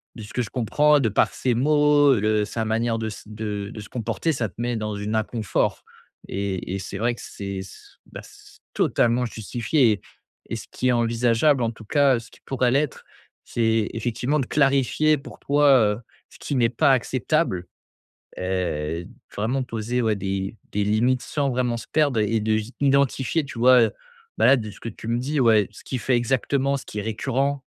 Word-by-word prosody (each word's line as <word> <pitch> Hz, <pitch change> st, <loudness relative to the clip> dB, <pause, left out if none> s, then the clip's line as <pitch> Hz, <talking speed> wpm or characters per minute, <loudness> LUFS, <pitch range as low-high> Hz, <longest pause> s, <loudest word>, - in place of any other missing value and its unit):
de 110 Hz, -, -8 dB
ce 105 Hz, -, -11 dB
que 125 Hz, -, 0 dB
je 120 Hz, -, -4 dB
comprends 145 Hz, +5 st, +3 dB
de 120 Hz, -, +1 dB
par 105 Hz, -, +2 dB
ses 125 Hz, -, 0 dB
mots, 145 Hz, +2 st, +4 dB
heu, 120 Hz, -, +1 dB
le 105 Hz, 0 st, +1 dB
sa 110 Hz, +1 st, -3 dB
manière 115 Hz, +1 st, 0 dB
de 110 Hz, -, -2 dB
s 110 Hz, -, -7 dB
de 105 Hz, -2 st, -5 dB
de -, -, -8 dB
se 105 Hz, -, -9 dB
comporter 120 Hz, +7 st, -2 dB
ça 120 Hz, -7 st, -2 dB
te -, -, -26 dB
met 120 Hz, 0 st, -1 dB
dans 105 Hz, -1 st, -3 dB
une 105 Hz, +1 st, -4 dB
inconfort 110 Hz, -1 st, -1 dB, 0.4 s
et 95 Hz, -2 st, -3 dB
et -, -, -3 dB
c'est 95 Hz, +1 st, -6 dB
vrai 120 Hz, +4 st, +1 dB
que -, -, -12 dB
c'est 100 Hz, -1 st, -6 dB
c'est, 95 Hz, -, -12 dB, 0.3 s
bah, -, -, -8 dB
c'est -, -, -17 dB, 0.2 s
totalement 120 Hz, +1 st, +2 dB
justifié 120 Hz, +3 st, +1 dB
et 105 Hz, -, -2 dB, 0.5 s
et -, -, -2 dB
ce -, -, -9 dB
qui 130 Hz, -, -2 dB
est -, -, +5 dB
envisageable, 120 Hz, +3 st, +2 dB
en 115 Hz, -, 0 dB
tout 110 Hz, -1 st, -14 dB
cas, 140 Hz, +1 st, +3 dB
ce 115 Hz, 0 st, -13 dB
qui -, -, -20 dB
pourra 130 Hz, -2 st, +1 dB
l'être, 140 Hz, +3 st, 0 dB, 0.4 s
c'est 115 Hz, -2 st, +1 dB
effectivement 120 Hz, +6 st, -1 dB
de -, -, -2 dB
clarifier 140 Hz, +2 st, +2 dB
pour 140 Hz, -, -12 dB
toi, 145 Hz, +1 st, +3 dB, 0.3 s
heu, 110 Hz, -, -10 dB, 0.3 s
ce -, -, -17 dB
qui 140 Hz, -, -3 dB
n'est 120 Hz, -2 st, +4 dB
pas 125 Hz, +3 st, +3 dB
acceptable 130 Hz, -, 0 dB, 0.7 s
et 85 Hz, -3 st, -2 dB, 0.3 s
vraiment 120 Hz, +6 st, 0 dB
poser, 120 Hz, 0 st, -2 dB
ouais, 110 Hz, -2 st, +1 dB
des 95 Hz, +2 st, -3 dB, 0.2 s
des 105 Hz, -, 0 dB
limites 120 Hz, +5 st, +2 dB
sans 145 Hz, -1 st, -1 dB
vraiment 125 Hz, -1 st, 0 dB
se 115 Hz, -, -8 dB
perdre 145 Hz, -7 st, +2 dB
et 110 Hz, +1 st, +1 dB
de 110 Hz, 0 st, +1 dB, 0.2 s
identifier, 140 Hz, +2 st, +2 dB
tu 135 Hz, -3 st, -9 dB
vois, 125 Hz, 0 st, +7 dB
heu, 110 Hz, -, +2 dB, 0.5 s
bah, -, -, +4 dB
là, 135 Hz, -, +7 dB
de 110 Hz, -4 st, -4 dB
ce -, -, -16 dB
que -, -, -5 dB
tu 110 Hz, -, -10 dB
me 115 Hz, +1 st, 0 dB
dis, 145 Hz, +4 st, -2 dB
ouais, 110 Hz, -5 st, +4 dB
ce 105 Hz, -, -15 dB
qu'il 130 Hz, -, -4 dB
fait 125 Hz, 0 st, +2 dB
exactement, 135 Hz, +3 st, 0 dB
ce 135 Hz, -, -8 dB
qui 105 Hz, -, -7 dB
est -, -, -2 dB
récurrent, 135 Hz, +5 st, -1 dB
115 Hz, 205 wpm, -24 LUFS, 110-135 Hz, 0.7 s, vois